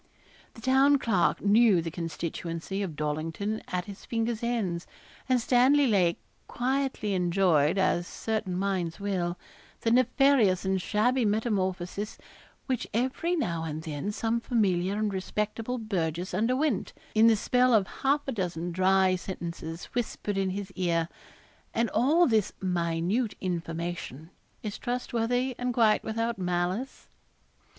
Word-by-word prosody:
The 225 - -12
Town 270 +3 +5
Clerk 200 -9 +1
knew 210 -1 +5
the 165 0 -3
constituency 170 +2 -4
of 180 -6 -4
Dollington 160 +8 -2
at 180 -1 -2
his 200 -1 -10
fingers' 230 -1 -2
ends; 210 -8 -1 0.4
and 255 -1 +4
Stanley 260 +4 +4
Lake 185 -8 +3 0.3
quietly 260 -4 -1
enjoyed, 175 -3 +2
as 175 -2 +1
certain 215 -5 -3
minds 185 -3 -1
will, 180 -3 -1 0.4
the 225 - +1
nefarious 250 -6 +4
and 190 -1 +1
shabby 245 +7 +1
metamorphosis 205 -2 -1 0.5
which 260 -4 -2
every 260 +9 0
now 170 - -1
and 160 0 -4
then 155 +4 -3
some 225 +2 -1
familiar 195 -6 +1
and 215 -1 0
respectable 210 +5 -2
burgess 180 -6 -2
underwent, 250 +5 0 0.2
in 220 +1 +6
the 225 - +6
spell 250 +4 +2
of 215 -4 +4 0.2
half 280 +2 +1
a - - 0
dozen 175 -5 -3
dry 185 +1 +3
sentences 170 -2 -6
whispered 225 -4 -2
in 195 -1 0
his 195 +1 -5
ear; 170 -3 0 0.7
and 230 0 +1
all 315 +8 +4
this 220 - +1
minute 180 +5 0
information 170 -3 -4 0.3
is 210 -2 -5
trustworthy 245 +1 -1
and 250 -1 -1
quite 220 -3 +4
without 230 0 -2
malice. 180 +7 -2
200 Hz, 130 wpm, -28 LUFS, 175-235 Hz, 0.7 s, in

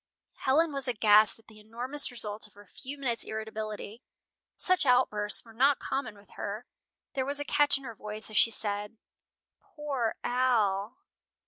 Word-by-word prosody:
Helen 300 +4 +1
was 275 -1 -3
aghast 215 -2 +4
at 225 - -10
the 215 -1 -17
enormous 245 +7 +3
result 215 -4 0
of 210 - -26
her 205 0 -15
few 270 +9 -9
minutes' 245 -5 -2
irritability. 220 0 -6 0.6
Such 370 -3 +2
outbursts 240 -6 +3
were 225 - -15
not 270 +4 +3
common 265 -6 -4
with 200 0 -20
her. 210 +4 -6 0.5
There 265 - -1
was 280 +2 -3
a 290 - -4
catch 290 0 +3
in 275 - -13
her 235 -3 -7
voice 215 0 -4
as - - -9
she - - +5
said, 210 0 -1 0.6
"Poor 275 -7 -4
Al!" 230 -4 0
230 Hz, 160 wpm, -29 LUFS, 210-265 Hz, 0.6 s, she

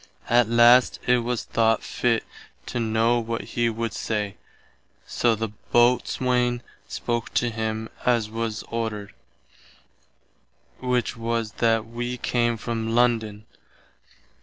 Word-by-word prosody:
At 120 -1 +4
last 120 +2 +6
it 125 0 +4
was 120 0 -2
thought 115 -1 +1
fitt 120 -2 0 0.4
to 120 - -3
know 115 +1 +2
what 115 0 -3
he 120 -1 0
would 115 -1 -3
say, 105 -3 -2 0.7
soe 120 -2 +1
the 110 0 -3 0.2
Boatswaine 125 0 +2 0.3
spoke 120 -1 -3
to 120 -1 +2
him 110 0 -3 0.2
as 120 -3 +2
was 110 -1 -3
ordered, 110 -3 -4 1.7
which 125 -1 0
was 115 -1 -2
that 115 -1 +2
wee 120 +2 -4
came 120 -1 0
from 115 +1 -3
London. 110 -3 +1
115 Hz, 115 wpm, -24 LUFS, 110-120 Hz, 1.7 s, last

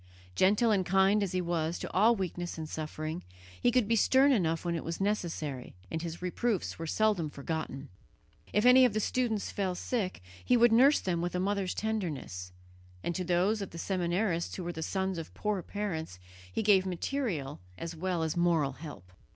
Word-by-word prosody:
Gentle 205 - +3
and 195 -3 +3
kind 195 +3 +3
as 195 -3 -1
he 185 - +1
was 170 -1 -1
to - - -6
all 220 +5 +5
weakness 175 -3 -4
and 160 -1 -5
suffering, 155 +1 -5 0.4
he - - +4
could 245 -3 +2
be 230 - +3
stern 265 +5 +5
enough 165 -8 +1
when 170 - 0
it 165 - -3
was 165 0 -4
necessary, 165 - -2 0.2
and 160 - -2
his 170 +1 -6
reproofs 195 +1 -1
were 165 - -4
seldom 205 -4 +1
forgotten. 145 -1 -5 0.6
If 210 +3 +2
any 255 +1 +8
of 245 -4 +4
the 215 - +1
students 225 -2 -1
fell 190 -3 -1
sick, 185 - -3 0.2
he 250 - +4
would 240 0 +6
nurse 265 +6 +6
them 175 -3 -1
with 175 +1 -2
a - - 0
mother's 195 0 -1
tenderness; 155 - -3 0.5
and 170 - -1
to 185 - -2
those 185 +5 +1
of 195 - -4
the 170 - -10
seminarists 175 0 -1
who 185 - -5
were 175 0 -4
the 160 - -6
sons 190 +1 -1
of 160 - -9
poor 210 -3 -1
parents 175 - -4 0.3
he 90 - -1
gave 200 -3 +5
material 180 - -3 0.2
as 165 0 -6
well 175 0 -1
as 160 +1 -1
moral 170 -5 +2
help. 135 - -10
180 Hz, 190 wpm, -30 LUFS, 165-210 Hz, 0.6 s, any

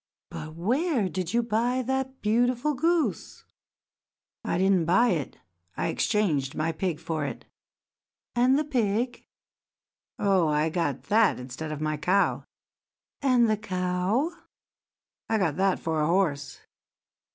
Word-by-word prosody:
But 155 +1 -7
where 245 - +1
did 180 0 -3
you 235 +1 +2
buy 240 +3 0
that 265 +1 -3
beautiful 245 +6 +2
goose?" 325 +4 -1 1.0
"I - - -1
did 190 +2 +3
not 175 -4 +2
buy 235 +8 +4
it; 160 - -2 0.4
I 85 - 0
exchanged 155 -11 0
my 155 +2 0
pig 165 -1 -2
for 160 -2 -3
it." 140 - -5 0.9
"And 250 +2 +4
the 300 - +1
pig?" 240 -3 -1 0.9
"Oh, 190 -5 +2
I 150 +1 +1
got 160 -6 -1
that 220 - +3
instead 135 +5 -6
of 155 -1 -5
my 155 0 -1
cow." 185 +6 +1 0.8
"And 250 -4 +4
the 215 -1 +1
cow?" 185 - -1 1.0
"I 225 - +2
got 165 -8 0
that 195 0 +2
for 160 -1 -1
a 150 - +2
horse." 155 -6 0
195 Hz, 135 wpm, -27 LUFS, 160-240 Hz, 1.0 s, buy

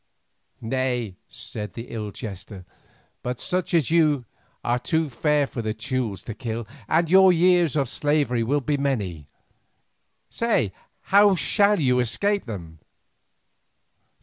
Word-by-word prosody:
"Nay," 125 -4 -1
said 105 -1 -7
this 115 - -7
ill 110 -2 -5
jester, 100 -3 -8 0.6
"but 125 0 -4
such 180 -1 -1
as 160 -3 +2
you 155 -6 +3 0.4
are 120 +1 +1
too 160 +2 0
fair 150 +3 +2
for 125 - -5
the 110 -1 -3
Teules 115 -3 -3
to 115 - -6
kill, 115 -1 -5 0.2
and 165 +1 +3
your 190 +2 +7
years 175 -3 +3
of 140 -3 +1
slavery 145 -3 0
will 140 +6 +1
be 145 +2 0
many. 100 - -2 1.0
Say, 220 - 0 0.3
how 200 0 +5
shall 205 +3 +3
you 125 -4 +2
escape 200 - 0
them?" 85 -8 -8
130 Hz, 130 wpm, -24 LUFS, 110-160 Hz, 1.0 s, your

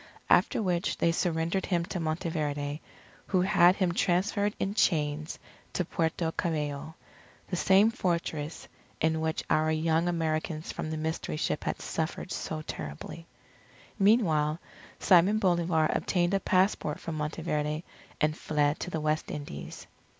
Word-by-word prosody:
After - - +4
which 175 -3 0
they 170 - +3
surrendered 170 +2 0
him 170 -3 +1
to 180 - -4
Monteverde, 155 -3 -2 0.5
who 185 -2 +2
had 180 -1 +5
him 185 -4 +1
transferred 200 +3 +1
in 195 - -1
chains 155 -6 +1 0.4
to 180 - 0
Puerto 160 0 -1
Cabello, 155 -2 -3 0.5
the 180 - -1
same 195 +5 +5
Fortress 170 -7 -2 0.3
in 160 0 +1
which 160 0 -1
our 155 +1 +2
young 160 +2 +1
Americans 160 -1 -1
from 155 - -4
the 155 - -3
Mystery 160 0 -3
Ship 150 - -1
had - - -2
suffered 160 +3 -3
so 155 -1 -4
terribly. 155 - -7 0.7
Meanwhile, 165 -8 +3 0.4
Simon 190 +3 +5
Bolivar 170 -5 +2
obtained 175 0 +1
a 195 - +3
passport 185 -5 +1
from 165 - -5
Monteverde 150 0 -2 0.4
and 155 0 +2
fled 150 -1 0
to - - -4
the 160 -3 -3
West 155 +1 0
Indies. 145 - -7
160 Hz, 135 wpm, -29 LUFS, 155-180 Hz, 0.7 s, had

